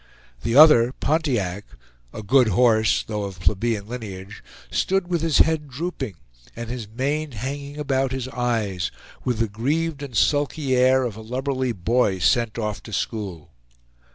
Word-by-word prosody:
The 115 - -1
other, 135 -5 +7
Pontiac, 120 - -1 0.5
a 110 - -7
good 125 +4 +4
horse, 110 +1 +3
though 105 -2 -4
of 95 -3 -8
plebeian 105 +2 0
lineage, 100 -5 -8 0.3
stood 190 -1 0
with 175 -3 -1
his 165 -2 +2
head 155 -2 +3
drooping 135 - -4 0.4
and 115 0 -6
his 120 -4 -5
mane 140 +6 -2
hanging 140 +5 -5
about 135 -3 0
his 130 -1 -3
eyes, 115 -8 -1 0.3
with 125 -3 -1
the 115 0 +1
grieved 145 +8 -1
and 130 -6 -5
sulky 145 0 +1
air 130 +1 +4
of 115 -4 -4
a - - -8
lubberly 130 +2 -2
boy 110 0 +1
sent 115 +5 +1
off 105 -4 -3
to 110 - -11
school. 95 -7 -4
125 Hz, 155 wpm, -23 LUFS, 110-140 Hz, 0.5 s, other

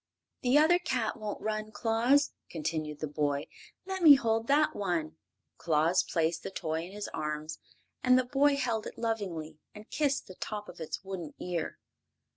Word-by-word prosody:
"The 250 +3 +4
other 325 +4 +5
cat 255 -10 -1
won't 210 -1 -5
run, 215 0 -2
Claus," 235 +6 +2 0.2
continued 155 -2 -3
the 155 - -1
boy. 145 -1 -1 0.4
"Let 380 0 -4
me 305 -4 +10
hold 225 -3 0
that 295 +2 +3
one." 165 -5 -2 0.4
Claus 165 +3 +3
placed 160 0 0
the - - -5
toy 160 -3 -3
in 180 - -11
his 205 +1 -5
arms, 155 +1 -4 0.4
and 255 0 +6
the 255 - +2
boy 280 +3 +3
held 235 -5 -1
it - - -9
lovingly 180 -9 -3 0.2
and 210 +1 -12
kissed 285 -2 0
the 185 - -10
tip 210 +2 -5
of - - -11
its 160 +4 -5
wooden 185 -5 -6
ear. 175 -3 -3
205 Hz, 170 wpm, -30 LUFS, 160-250 Hz, 0.4 s, me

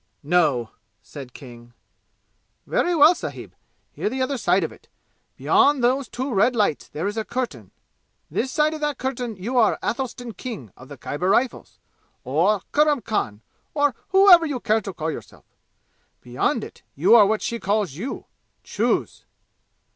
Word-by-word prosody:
"No!" 145 -8 +1 0.3
said 135 -4 -10
King. 120 -3 -13 0.9
"Very 350 0 +1
well, 310 +2 +7
sahib! - - -8 0.4
Hear - - -2
the 260 +3 -4
other 275 +2 -1
side 185 -1 +2
of - - -3
it! - - -18 0.5
Beyond 285 -3 +3
those 255 +2 +2
two 260 +1 -4
red 220 +5 +3
lights 205 -9 0
there 160 +4 -5
is 205 +2 -3
a 220 - -1
curtain. 215 - -4 0.6
This 240 - -1
side 305 +1 +2
of 310 - -7
that 295 -1 -1
curtain 250 -3 -3
you 235 +7 -1
are 220 - +3
Athelstan 245 -1 -3
King 175 - -8
of 130 - -14
the 145 - -11
Khyber 175 +6 -3
Rifles, 245 +4 0 0.5
or 175 +10 +1
Kurram 295 -3 +3
Khan, 110 - -2 0.3
or 290 -2 +2 0.2
whatever 380 -3 +7
you 280 -4 -3
care 220 -1 +1
to 195 - -6
call 160 -2 -3
yourself. - - -10 0.8
Beyond 125 +1 -1
it, - - -11
you 180 +10 +4
are 215 -4 +8
what 215 +1 0
she 235 -1 -3
calls 205 -6 0
you! 210 - -6 0.4
Choose!" - - -1
220 Hz, 160 wpm, -23 LUFS, 160-260 Hz, 0.9 s, are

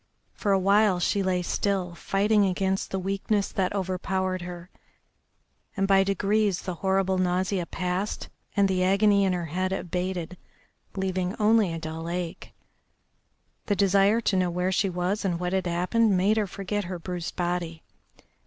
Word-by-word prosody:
For 205 - -1
a 195 - +5
while 200 0 +3
she 200 +3 +1
lay 185 -2 0
still, 185 -1 -1
fighting 205 +4 +2
against 190 0 0
the 195 - -2
weakness 195 +2 -1
that 185 -2 0
overpowered 185 -1 -2
her, 175 +1 -8 1.1
and 195 0 +1
by 195 -1 +5
degrees 200 0 +1
the 180 - -3
horrible 190 -1 +1
nausea 185 0 0
passed 180 +3 -3 0.3
and 200 -1 +5
the 185 -1 +1
agony 200 +1 +4
in 190 - +1
her 175 -1 -2
head 185 +4 -2
abated, 180 -1 -3 0.6
leaving 190 0 -1
only 215 -3 +3
a 165 - -3
dull 160 +1 -5
ache. 175 -1 -5 1.2
The 205 - +2
desire 200 +3 +3
to 205 - +1
know 185 -1 +2
where 180 +2 -1
she 195 +1 +1
was 180 +3 -1
and 175 -4 -1
what 180 +1 -2
had 190 -1 0
happened 185 +4 +2
made 200 +4 +2
her 210 -2 +1
forget 200 +1 -3
her 180 0 -4
bruised 175 0 -5
body. 175 -2 -2
190 Hz, 160 wpm, -26 LUFS, 180-200 Hz, 1.2 s, a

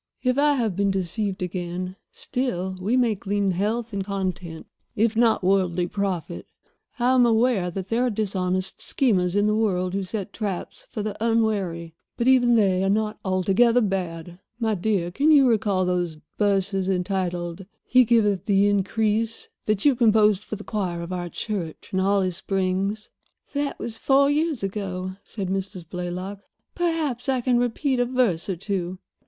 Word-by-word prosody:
If 255 -1 +2
I 295 0 +4
have 225 -8 0
been 200 +1 +1
deceived 195 +1 -2
again, 180 0 -4 0.2
still 190 -8 -2
we 220 +7 +1
may 240 -3 +3
glean 200 0 -1
health 215 +5 -1
and 195 -1 -1
content, 185 -4 -4 0.3
if 220 +1 +2
not 225 -3 +3
worldly 180 -2 +2
profit. 180 - -3 0.5
I 250 +1 +3
am 255 -1 +5
aware 230 -5 +2
that 190 +2 -6
there 230 +2 +1
are - - +1
dishonest 185 -3 -2
schemers 190 -9 +1
in 205 0 +3
the 210 - +2
world 185 -4 0
who 195 - 0
set 200 +1 -5
traps 200 -5 -5
for 210 - -4
the 210 -1 -3
unwary, 200 -8 0 0.2
but 235 - 0
even 245 -2 +5
they 190 -4 +3
are 195 - +1
not 215 +1 0
altogether 195 +6 +3
bad. 175 -5 -3 0.2
My 225 -2 +1
dear, 185 -3 0
can 280 - +2
you 285 -4 +7
recall 205 -5 +2
those 175 -3 -1 0.2
verses 195 -2 +1
entitled 180 -1 -2 0.2
'He 255 0 +5
Giveth 210 -5 +2
the 200 -1 +3
Increase,' 215 +3 0 0.2
that 215 +1 +1
you 285 - +6
composed 215 -4 +4
for 215 - -5
the 210 - -9
choir 185 -6 -3
of 175 +2 -6
our 175 -1 -3
church 175 -3 -5
in 190 - +1
Holly 195 -1 +2
Springs?" 195 +3 -2 0.4
"That 285 0 -2
was 225 -1 -6
four 275 +1 +4
years 300 -5 0
ago," 185 -2 -3
said 195 -4 -5
Mrs. 190 -3 -4
Blaylock; 180 +3 -5 0.3
"perhaps 315 -7 -1
I 260 -1 +2
can 245 0 +2
repeat 245 +2 0
a 245 - +3
verse 240 -9 0
or 190 - 0
two. 185 0 -3
200 Hz, 165 wpm, -24 LUFS, 185-230 Hz, 0.5 s, you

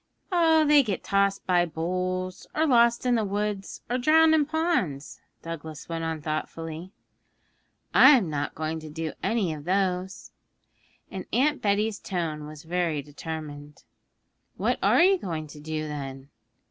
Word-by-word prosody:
'They 320 -4 +5
get 205 -6 -3
tossed 195 0 +1
by 180 -1 +3
bulls, 185 +3 -3
or 315 - +2
lost 235 -3 +4
in 250 - +3
the 225 -2 +2
woods, 205 0 -3
or 250 +1 -1
drowned 315 +4 +5
in 300 -3 +3
ponds,' 170 - -1 0.2
Douglas 160 -2 -7
went 165 -1 -4
on 160 -2 -3
thoughtfully. 160 +3 -5 1.0
'I'm 255 -11 +7
not 145 -2 -3
going 160 +1 -3
to 155 0 -9
do 160 +1 -4
any 210 -8 0
of 150 -1 -9
those.' 185 0 -1 0.8
And 255 +9 0
Betty's 210 0 0
tone 160 -5 -4
was 155 +1 -10
very 165 -3 -1
determined. 150 0 -8 0.7
'What - - 0
are - - +5
you 380 0 +4
going 160 - -4
to 150 0 -12
do, 155 0 -4
then?' 135 -2 -7
180 Hz, 140 wpm, -26 LUFS, 155-225 Hz, 1.0 s, I'm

